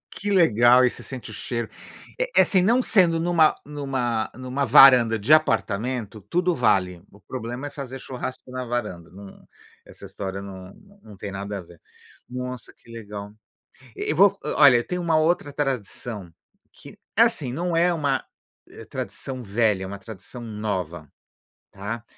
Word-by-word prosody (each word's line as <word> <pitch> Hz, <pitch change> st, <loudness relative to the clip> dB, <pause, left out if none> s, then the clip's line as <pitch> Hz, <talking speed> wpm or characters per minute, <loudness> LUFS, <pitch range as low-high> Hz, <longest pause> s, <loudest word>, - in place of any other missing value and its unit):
Que 205 Hz, +1 st, -4 dB
legal 125 Hz, -, +5 dB
e -, -, +4 dB
você -, -, -8 dB
sente 125 Hz, -4 st, -8 dB
o -, -, -10 dB
cheiro. 120 Hz, +1 st, -4 dB, 0.5 s
É -, -, +3 dB
assim, 185 Hz, -2 st, +4 dB
não 235 Hz, +7 st, +3 dB
sendo 180 Hz, -8 st, +4 dB
em 165 Hz, +2 st, -2 dB
uma 165 Hz, -3 st, +4 dB
em 150 Hz, -, -11 dB
uma 125 Hz, -5 st, -1 dB
em 130 Hz, +1 st, -9 dB
uma 135 Hz, +2 st, -1 dB
varanda 120 Hz, -2 st, +7 dB
de 110 Hz, +8 st, +3 dB
apartamento 115 Hz, -6 st, 0 dB
tudo 175 Hz, -, 0 dB
vale, 90 Hz, -7 st, +1 dB
o 100 Hz, -, -18 dB
problema 125 Hz, +5 st, -6 dB
é -, -, -6 dB
fazer 135 Hz, -2 st, -7 dB
churrasco 130 Hz, 0 st, -7 dB
na 130 Hz, 0 st, -4 dB
varanda, 105 Hz, -9 st, -4 dB
não, 100 Hz, +1 st, -13 dB, 0.4 s
essa -, -, -13 dB
história 95 Hz, 0 st, -6 dB
não 95 Hz, -1 st, -10 dB, 0.3 s
não 105 Hz, -, -14 dB
tem 100 Hz, +1 st, -6 dB
nada 100 Hz, +1 st, -5 dB
a -, -, -6 dB
ver. 85 Hz, -1 st, -17 dB, 0.5 s
Nossa, 125 Hz, 0 st, -6 dB
que 115 Hz, -, -19 dB
legal. 105 Hz, -2 st, -8 dB, 0.6 s
E -, -, -2 dB
vo 200 Hz, +4 st, +5 dB, 0.2 s
olha, 140 Hz, -5 st, +8 dB
eu 120 Hz, -, -2 dB
tenho 180 Hz, 0 st, -3 dB
uma 165 Hz, -2 st, +2 dB
outra 155 Hz, -2 st, +1 dB
tradição, 120 Hz, -, -4 dB, 0.4 s
que -, -, -14 dB, 0.2 s
é -, -, +8 dB
assim 135 Hz, -5 st, 0 dB
não 170 Hz, +5 st, -2 dB
é 175 Hz, +1 st, +3 dB
uma 145 Hz, -5 st, 0 dB, 0.7 s
tradição 130 Hz, -2 st, -6 dB
velha, 105 Hz, -2 st, +1 dB
é -, -, -5 dB
uma 100 Hz, +1 st, -7 dB
tradição 110 Hz, +4 st, -10 dB
nova, 95 Hz, -, -4 dB, 0.6 s
tá? 105 Hz, +4 st, -6 dB
120 Hz, 170 wpm, -24 LUFS, 100-145 Hz, 0.7 s, olha